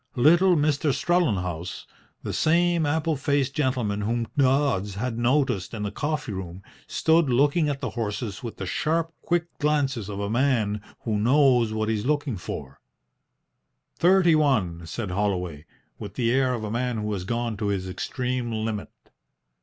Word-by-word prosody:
Little 175 +8 +5
Mr. 150 -1 +2
Strellenhaus, 90 - -1 0.4
the - - -4
same 170 0 +2
apple 160 +2 0
faced 140 -1 0
gentleman 125 -8 0
whom 115 +2 -1
Dodds 130 -8 +2
had 115 +2 -3
noticed 125 -5 +1
in 105 - -4
the 100 - -2
coffee 150 +1 -2
room, 95 0 -7 0.2
stood 160 -2 +2
looking 145 +5 +3
at 140 -1 -3
the - - -3
horses 105 -2 -4
with 115 -3 -7
the 95 - -4
sharp, 165 - -1
quick 175 0 0
glances 135 -8 0
of 100 -1 -5
a 100 - -2
man 110 -3 +1 0.2
who 110 -3 -1
knows 125 -1 +4
what 110 0 -1
he 110 - +1
is 105 0 -2
looking 145 -4 0
for. 70 -6 -7 1.2
"Thirty 175 -1 +4
one," 105 - +1
said 105 +2 -4
Holloway, 90 -6 -2 0.3
with - - -8
the 115 -2 +1
air 130 0 +2
of 110 - -5
a 105 - -4
man 120 0 -1
who 105 0 -2
has 95 -3 -3
gone 115 +3 -2
to 105 0 -2
his 95 -2 -1
extreme 125 +5 -3
limit. 110 -1 -3
120 Hz, 160 wpm, -25 LUFS, 105-145 Hz, 1.2 s, Little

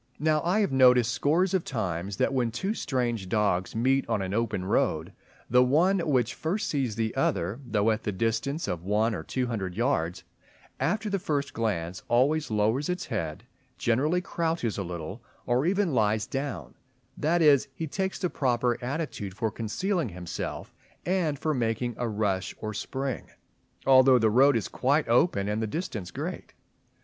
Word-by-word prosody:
Now 155 0 +2
I 180 +7 +2
have 200 - +1
noticed 125 -3 +5
scores 165 +9 +2
of 185 -3 +2
times 100 - -3
that - - +1
when 125 -3 +1
two 190 - -2
strange 120 - -2
dogs 100 -3 0
meet 130 +4 +2
on 100 - 0
an 95 0 -4
open 105 -4 -1
road, - - 0 0.3
the 125 +2 +5
one 170 +10 +3
which 130 -8 +1
first 205 +7 -2
sees 135 - -1
the 110 -1 -2
other, 95 +9 0
though 110 -3 +1
at 110 0 -1
the 105 - -2
distance 115 - -1
of 85 - -3
one 105 +4 +1
or 95 - -3
two 125 +10 -2
hundred 100 -7 -3
yards, 95 -8 0 0.6
after 215 +1 0
the 200 -1 0
first 140 -5 -2
glance 95 -7 -2
always 145 +6 +2
lowers 110 +7 +1
its 180 +1 -2
bead, 80 +4 -3 0.3
generally 150 +10 +1
crouches 165 - -1
a - - -1
little, 90 +4 -6 0.2
or 125 +5 +1
even 190 -3 +1
lies 110 -2 +2
down; 135 - -4 0.4
that 165 +2 +1
is, 145 -4 +5
he 165 - -3
takes 190 +5 -2
the 185 - 0
proper 120 -2 0
attitude 125 - -4
for 110 +1 -1
concealing 160 - -1
himself 90 -2 -6 0.3
and 175 -5 0
for 155 +2 -1
making 120 -1 -1
a 120 -1 -1
rush 100 -3 -1
or 110 -1 -4
spring 130 +3 -4 0.6
although 130 -1 +7
the 110 -2 +3
road 135 +3 +5
is 110 - -2
quite 140 +4 +1
open 115 - +3
and 105 +1 -1
the 110 - -1
distance 110 - -4
great. - - -6
125 Hz, 170 wpm, -27 LUFS, 105-150 Hz, 0.6 s, although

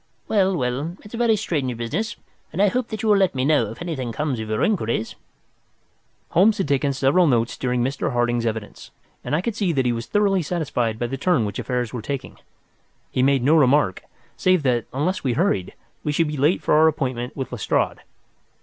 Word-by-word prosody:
Well, 195 -3 +2
well, 140 +6 -2
it's 210 - -13
a - - -4
very 235 -2 +3
strange 145 - -2
business, 160 - -3 0.4
and 175 - -6
I 205 0 +5
hope 250 +2 -1
that 220 -1 -6
you 220 - +1
will 205 - +6
let 190 -6 +2
me 130 0 0
know 140 -8 +3
if 115 +10 -8
anything 135 -9 -3
comes 140 0 -2
of 110 -1 -5
your 110 0 0
inquiries." 115 - 0 1.2
Holmes 205 +5 +4
had 195 - -1
taken 140 0 +1
several 140 +6 +3
notes 115 -4 +1
during 125 -2 -1
Mr. 135 +2 -1
Harding's 120 -1 0
evidence, 110 -2 -5 0.3
and - - -1
I 160 - +1
could 220 +2 -3
see 195 -5 0
that 135 -3 +1
he 120 - +2
was 115 -1 -4
thoroughly 200 -2 +2
satisfied 140 -9 -1
by 120 - -2
the 135 +3 -4
turn 140 -5 +2
which 100 -1 -4
affairs 125 -3 -2
were 120 - -4
taking. 135 +3 -5 0.7
He 130 - 0
made 135 -1 +3
no 150 +5 +4
remark, 140 - +3
however, - - -31 0.3
save 185 -3 +2
that, 120 -4 +1
unless 165 +8 -1
we 130 -3 +1
hurried, 115 - 0 0.3
we 150 - 0
should 155 +1 +1
be 150 - -3
late 150 +6 +2
for - - +2
our 155 +1 +6
appointment 130 -5 -2
with 135 - -4
Lestrade. 125 -5 0
140 Hz, 215 wpm, -22 LUFS, 120-180 Hz, 1.2 s, will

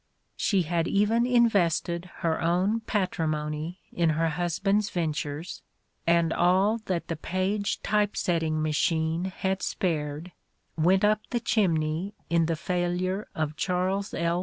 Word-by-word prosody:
She 195 -4 +1
had 170 +1 0
even 225 +4 +2
invested 180 -7 +2
her 165 -1 0
own 185 +6 +2
patrimony 160 -5 -2
in 170 -2 +2
her 165 0 +2
husband's 190 +5 0
ven 165 -4 -1
tures, 150 +3 -5 0.5
and 170 -1 +3
all 190 +6 +3
that 180 -3 -2
the 165 - -2
Paige 190 +5 -1
Typesetting 170 -6 +1
Machine 160 +2 +1
had 190 0 -2
spared 155 -1 -2 0.4
went 180 +5 +3
up 215 0 +3
the 240 - 0
chimney 175 -4 0 0.2
in 165 -1 +3
the 165 - 0
failure 180 +3 -1
of 155 -1 -2
Charles 190 +3 -1
L. 170 +1 0
175 Hz, 130 wpm, -27 LUFS, 160-195 Hz, 0.5 s, and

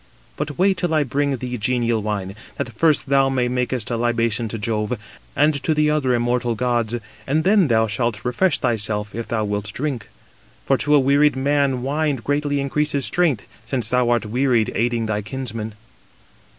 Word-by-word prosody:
But 150 -1 -4
wait 190 +1 +3
till 175 -3 0
I 155 - +3
bring 140 +1 0
thee 125 0 -5
genial 120 -1 +1
wine, 100 -2 -3 0.2
that 120 - -4
first 155 +6 +2
thou 135 -1 +4
mayest 125 -2 0
make 125 -1 -1
a 120 -2 -2
libation 115 -1 0
to 115 - -4
Jove, 110 +2 -1 0.4
and 155 +1 +4
to 155 +3 +1
the 150 0 +3
other 135 -5 +1
immortal 120 0 0
gods, 120 -1 0 0.3
and 155 +3 +1
then 195 -2 +4
thou 110 -3 +3
shalt 110 +1 -2
refresh 145 +10 +2
thyself, 105 -3 -1
if 115 0 -5
thou 110 -2 -1
wilt 105 0 -3
drink. 135 -6 -3 0.6
For 135 - +3
to 150 0 +3
a - - +6
wearied 140 +2 +3
man 135 -2 +1
wine 145 +2 0
greatly 145 +3 -1
increases 140 0 0
strength; 160 - +1 0.2
since 120 +1 -1
thou 125 -1 +2
art 120 -2 +1
wearied 120 0 +1
aiding 115 0 0
thy 105 -1 -1
kinsmen." 110 -2 -5
125 Hz, 175 wpm, -21 LUFS, 115-145 Hz, 0.6 s, a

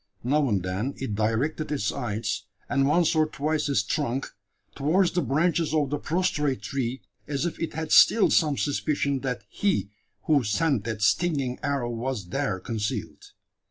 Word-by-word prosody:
Now 140 +2 +2
and 100 -4 0
then 95 +9 -2
it 130 -6 -4
directed 115 +9 -1
its 120 -9 0
eyes, 110 -4 -3 0.2
and 135 -1 +2
once 170 +3 +3
or 155 -1 +3
twice 155 0 -1
its 120 -8 +2
trunk, 135 +2 -2 0.4
towards 170 +5 +2
the 175 - 0
branches 160 +4 +1
of 145 -3 +1
the 145 - -1
prostrate 150 -5 0
tree 130 -2 -3 0.2
as 145 +1 -1
if 175 - -3
it 165 - -3
had 160 -1 -4
still 225 - +6
some 150 -4 +3
suspicion 145 -1 0
that 125 -4 -3
he 190 - -1 0.3
who 145 -4 +3
sent 125 +1 +1
that 110 -2 -3
stinging 130 - +1
arrow 140 -4 -1
was 115 -5 -4
there 135 -6 -1
concealed. 110 0 -4
140 Hz, 160 wpm, -26 LUFS, 115-155 Hz, 0.4 s, still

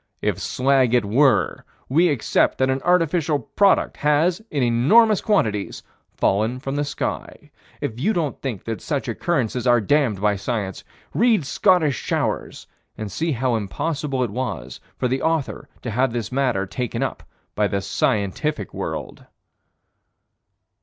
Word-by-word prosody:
If - - -1
slag 130 -2 +2
it 120 -4 +2
were, 130 +7 +2 0.2
we 165 +7 +3
accept 140 -8 +1
that 130 0 +2
an 130 0 -1
artificial 165 -3 +2
product 195 - +2
has, 155 +6 +2
in 140 -4 0
enormous 185 - +4
quantities, 110 - 0 0.3
fallen 110 +6 +1
from 135 +1 -4
the 145 - 0
sky. 145 +1 -5 0.3
If 115 - -4
you 200 +11 +2
don't 165 -8 -2
think 120 -8 -4
that 115 -1 -4
such 145 -4 -2
occurrences 125 -1 -1
are 120 0 +5
damned 115 -2 +1
by 105 0 +1
Science, 100 -3 -3 0.3
read 225 - +3
Scottish 155 - +2
Showers - - -2 0.3
and 105 -2 -5
see 160 - -1
how 125 -1 0
impossible 135 +5 -2
it 120 - -3
was 110 - -4 0.2
for 125 - 0
the 130 +2 -1
author 160 -4 -1
to 125 - -3
have 125 +3 +1
this 115 -3 -3
matter 125 -7 0
taken 120 +5 -3
up - - -3 0.3
by 105 -1 +1
the 100 - -1
scientific 100 +8 -1
world. - - -6
130 Hz, 145 wpm, -22 LUFS, 110-150 Hz, 0.3 s, are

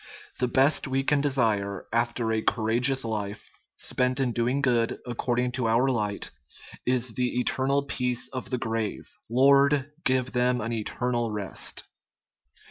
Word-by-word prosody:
The 125 - +2
best 135 +5 +3
we 135 0 0
can 145 +1 +2
desire 110 -9 0
after 120 -1 0
a 110 - 0
courageous 120 +4 +2
life, 105 -2 -5 0.3
spent 125 +1 0
in 130 -2 +1
doing 125 +4 0
good 120 -3 +1
according 125 0 -1
to 125 -2 -1
our 120 +4 +3
light, 105 -4 -2 0.6
is 125 0 +2
the 125 0 -1
eternal 135 +3 +1
peace 125 -3 -1
of 130 -1 -6
the 125 - -1
grave. 115 -3 -3
" - - -54
Lord, 140 +3 +4
give 130 -1 +1
them 125 0 +1
an 115 +2 -3
eternal 120 +1 -1
rest." 105 -3 -2
125 Hz, 145 wpm, -26 LUFS, 115-130 Hz, 0.6 s, Lord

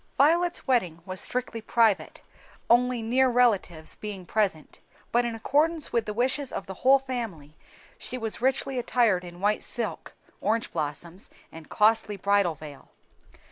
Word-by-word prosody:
Violet's 340 +5 +3
wedding 180 - 0
was 185 0 -4
strictly 245 -2 -2
private, 220 -2 +1 0.5
only 245 0 +3
near 255 +3 +3
relatives 205 -10 +1
being 200 -4 -7
present; 190 -7 -1 0.3
but 240 +1 +2
in 235 -1 -3
accordance 300 +7 0
with 235 -2 +1
the 210 - -2
wishes 265 +3 0
of - - -5
the 190 - -7
whole 270 +2 +6
family, 225 - -6 0.4
she 255 - -5
was 225 -1 -4
richly 265 0 +1
attired 230 -7 +2
in 175 0 -11
white 210 +1 +1
silk, 230 -3 -4 0.3
orange 225 +3 0
blossoms, 165 +4 -5 0.2
and 160 -1 -12
costly 215 -1 +2
bridal 200 -3 +2
veil. 145 -2 -12
225 Hz, 145 wpm, -26 LUFS, 185-250 Hz, 0.5 s, whole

